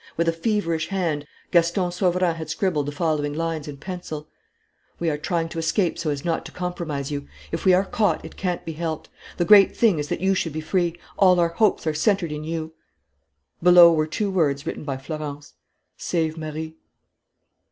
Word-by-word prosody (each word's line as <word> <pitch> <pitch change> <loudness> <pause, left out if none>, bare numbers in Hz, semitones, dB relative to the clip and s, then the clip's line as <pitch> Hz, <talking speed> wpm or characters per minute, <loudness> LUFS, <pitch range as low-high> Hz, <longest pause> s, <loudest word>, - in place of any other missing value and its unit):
With 170 0 +1
a 165 - +3
feverish 165 -3 -1
hand, 165 -7 -2 0.2
Gaston 175 +1 +2
Sauverand 180 -2 +1
had 160 -1 -6
scribbled 165 -4 0
the - - -2
following 145 -2 -1
lines 165 -1 -3
in 145 -1 -7
pencil: 155 -2 -6 0.7
"We 170 -1 0
are 150 - -2
trying 165 0 -1
to 165 - -5
escape 170 +2 0
so 165 -2 -1
as 145 +1 -3
not 165 -1 0
to - - -12
compromise 165 -6 -4
you. 140 -1 -4 0.2
If - - -4
we 185 - +6
are 190 +2 +2
caught, 195 -6 0
it 160 - -10
can't 180 -2 -3
be 165 - -4
helped. 160 -1 -4 0.3
The 175 - +1
great 200 -1 +7
thing 210 -9 +4
is 150 - -3
that - - -2
you 190 +2 +2
should 165 -4 -1
be 155 - -3
free. 175 +1 -1 0.2
All 185 -2 +6
our 170 -1 +3
hopes 205 +2 +1
are 155 - +1
centred 170 +1 +1
in 150 0 -5
you." 160 0 -4 0.9
Below 175 -1 +8
were 155 -1 +1
two 200 +5 -2
words 145 -6 +1
written 160 - -5
by 135 -2 -3
Florence: 145 +1 -7 0.4
"Save 160 -2 -1
Marie." 160 0 -6
165 Hz, 195 wpm, -23 LUFS, 155-180 Hz, 0.9 s, Below